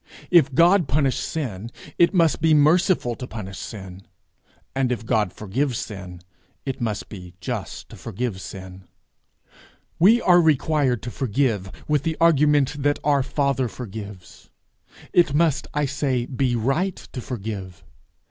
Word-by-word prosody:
If 145 -7 +5
God 175 +1 +5
punish 135 0 +1
sin, 115 -9 -4 0.3
it 170 - +5
must 170 -5 +2
be 160 -1 +4
merciful 155 -3 +3
to 125 +2 -7
punish 100 -5 -7
sin; 95 -3 -8 0.7
and 135 -2 +1
if 115 -2 -3
God 110 -5 +1
forgive 120 +6 -2
sin, 90 -5 -7 0.4
it 135 -3 -4
must 110 -3 -2
be 90 -4 -10
just - - -5
to - - -11
forgive 105 -2 -4
sin. 95 0 -9 1.1
We 215 +8 +6
are 175 -5 +5
required 145 -5 +2
to 120 - -5
forgive, 115 -7 -1 0.2
with 150 -2 +2
the 160 +1 -2
argument 150 -3 +3
that 145 +1 +2
our 145 -1 +3
father 140 -1 0
forgives. 105 -6 -9 0.6
It 165 -5 +4
must, 155 -4 +2
I 150 0 0
say, 135 -3 -1
be 125 -1 -1
right 145 - 0
to 125 - -9
forgive. 100 -7 -6
130 Hz, 140 wpm, -23 LUFS, 105-150 Hz, 1.1 s, We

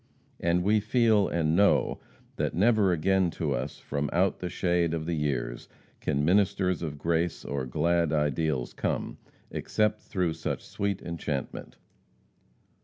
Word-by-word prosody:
And 85 +1 +1
we 105 +3 +3
feel, 110 -2 +3
and 80 -1 +1
know, 100 +2 +3 0.4
that - - -1
never 105 0 +4
again 95 +2 +2
to 75 -4 0
us - - -3
from 70 0 -3
out 95 +2 +1
the 90 - -3
shade 85 -2 +1
of 80 -1 -4
the 85 - -1
years, 75 -5 -2 0.3
can 70 +1 0
ministers 95 -1 +2
of 75 -3 -4
grace 85 +2 -1
or 70 -2 -3
glad 85 +4 +1
ideals 75 -3 0
come, - - -3 0.3
except 105 0 0
through 90 -4 -1
such - - -4
sweet 100 -1 -3
enchantment. 80 -5 -5
85 Hz, 140 wpm, -28 LUFS, 75-95 Hz, 0.4 s, never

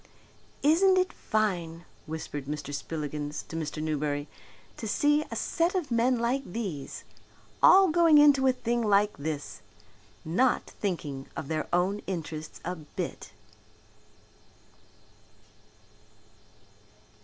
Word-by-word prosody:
"Isn't 370 +6 +5
it 370 0 +1
fine," 175 -6 -2 0.2
whispered 155 -3 -5
Mr. 145 0 -5
Spillikins 150 0 -4
to - - -7
Mr. 155 -1 -3
Newberry, 150 -1 -1 0.5
"to 225 - -5
see 295 +7 +2
a - - -5
set 340 +3 0
of 325 -8 -2
men 240 +2 +3
like 240 +4 0
these 175 - -5 0.6
all 385 -1 +7
going 330 -1 +5
into 285 -2 +6
a - - +6
thing 240 -1 -1
like 210 -1 +3
this, 145 0 -5 0.6
not 240 +11 +2
thinking 150 -9 -4
of 140 - -6
their 155 -1 -2
own 185 +4 +1
interests 160 -4 -5
a 180 - -2
bit?" 150 -2 -6
185 Hz, 110 wpm, -28 LUFS, -, 0.6 s, all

